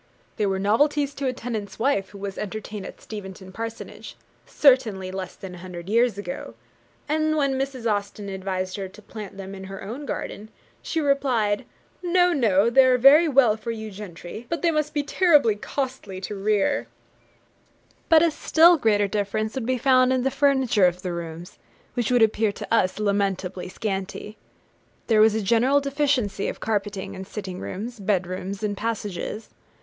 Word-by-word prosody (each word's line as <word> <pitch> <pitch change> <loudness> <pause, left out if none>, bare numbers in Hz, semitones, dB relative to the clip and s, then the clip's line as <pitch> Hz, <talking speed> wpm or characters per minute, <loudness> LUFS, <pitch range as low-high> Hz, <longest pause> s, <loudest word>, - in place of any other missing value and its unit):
They 210 - +1
were 190 -1 0
novelties 285 +8 +2
to 275 -2 -3
a - - +2
tenant's 215 -5 -5
wife 225 -6 +1
who 200 - -12
was 195 -1 -5
entertained 210 -1 -5
at - - -11
Steventon 190 -3 -9
Parsonage, 225 +3 -7 0.3
certainly 225 -10 +3
less 190 -1 -6
than 190 -2 -9
a - - -9
hundred 180 0 -8
years 230 -1 +3
ago; 185 -3 -6 0.5
and 310 +1 +1
when 275 -2 +2
Mrs. 265 -2 -3
Austen 205 -1 -2
advised 185 -1 -3
her 195 -1 -4
to 205 +3 -15
plant 205 -2 -9
them 195 0 -7
in 190 -1 -8
her 195 0 -8
own 250 +9 -6
garden, 215 +1 -5 0.3
she 325 - -2
replied, 260 -8 +1 0.4
'No, 355 0 +3
no; 225 - +3
they 265 +2 +7
are 255 -1 +4
very 285 +7 +7
well 260 -7 +4
for 220 +1 -7
you 220 -1 -5
gentry, 195 +2 -9
but 335 -3 -3
they 340 - +4
must 305 -1 -1
be 290 - +1
terribly 290 - +4
costly 250 -5 -4
to 200 - -5
rear.' 205 0 +1 1.2
But 325 -1 +7
a 335 - +3
still 330 +3 +5
greater 210 -6 +2
difference 215 +2 -2
would 260 -4 -4
be 255 0 +1
found 255 0 +4
in 255 -1 +1
the 270 - +1
furniture 265 -8 +3
of 180 +1 -3
the 180 -2 -3
rooms, 170 0 -7 0.3
which 240 -3 -1
would 245 -2 +5
appear 220 -1 +2
to - - -5
us 185 -5 +2
lamentably 195 -3 -1
scanty. 195 +1 -4 0.7
There 220 -2 +4
was 220 0 +5
a 220 - -1
general 235 +7 +3
deficiency 275 -8 0
of - - -5
carpeting 205 -3 -2
in 190 - -7
sitting 190 -2 -6
rooms, 225 +5 -6
bed 195 -2 +1
rooms, 185 +3 -5
and 205 -1 -1
passages. 210 -1 -4
215 Hz, 175 wpm, -24 LUFS, 195-265 Hz, 1.2 s, they